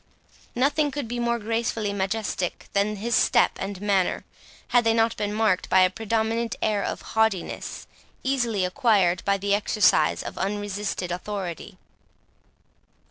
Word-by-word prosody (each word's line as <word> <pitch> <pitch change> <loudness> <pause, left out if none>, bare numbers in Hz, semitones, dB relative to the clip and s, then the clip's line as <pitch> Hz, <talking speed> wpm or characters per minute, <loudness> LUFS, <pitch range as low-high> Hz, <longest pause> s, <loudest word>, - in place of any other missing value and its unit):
Nothing 290 +4 +2
could 285 -3 -4
be 240 +1 -4
more 235 0 +1
gracefully 225 -1 -2
majestic 195 -2 -2
than 200 +1 +1
his 230 +4 -3
step - - +4
and 195 -1 -4
manner, 195 -2 0 0.4
had 245 -1 +4
they 225 0 +2
not 225 0 +2
been 205 -1 -2
marked 210 -3 +1
by 190 - +5
a 185 0 +4
predominant 225 +2 -1
air 210 -2 0
of - - -4
haughtiness, 220 -5 -1 0.4
easily 240 -8 0
acquired 185 -3 +2
by 200 0 +2
the 200 +1 0
exercise 210 -1 +3
of - - -7
unresisted 200 -2 -3
authority. 185 0 -5
210 Hz, 135 wpm, -25 LUFS, 195-230 Hz, 0.4 s, by